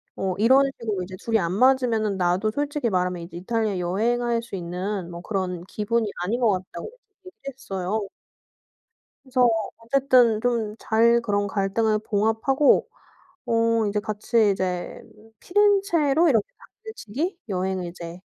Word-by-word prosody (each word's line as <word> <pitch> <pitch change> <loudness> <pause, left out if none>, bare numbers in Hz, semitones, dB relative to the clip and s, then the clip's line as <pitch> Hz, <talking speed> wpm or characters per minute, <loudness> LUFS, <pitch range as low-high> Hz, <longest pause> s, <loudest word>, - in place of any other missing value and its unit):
어 190 -1 -2
이런 260 +6 +5
식으로 210 -5 -2
이제 185 +1 -8
둘이 225 -1 +1
안 170 0 -1
맞으면은 230 -4 +2
나도 185 +4 +1
솔직히 290 -1 -1
말하면 180 -2 -1
이제 170 0 -9
이탈리아 215 0 -1
여행할 230 +6 0
수 230 -4 -8
있는 180 +1 -4
뭐 170 0 -8
그런 180 -3 -3
기분이 215 +1 -1
아닌 220 +7 -1
것 230 -4 +3
같다."고 185 -2 -5 0.4
얘기를 370 - -10 0.2
했어요. 205 -6 -4 1.2
그래서 255 -2 +2 0.3
어쨌든 240 -1 +3
좀 230 -3 -1
잘 235 +1 +3
그런 205 -3 0
갈등을 210 +2 0
봉합하고 220 +7 +2 0.6
어 230 -1 +2
이제 210 +1 0
같이 215 0 +1
이제 180 -2 -3 0.4
피렌체로 355 -6 +3
이렇게 225 -7 +2 0.4
당일치기 350 - -5
여행을 185 -1 -2
이제 170 0 -9
220 Hz, 305 characters per minute, -24 LUFS, 190-240 Hz, 1.2 s, 이런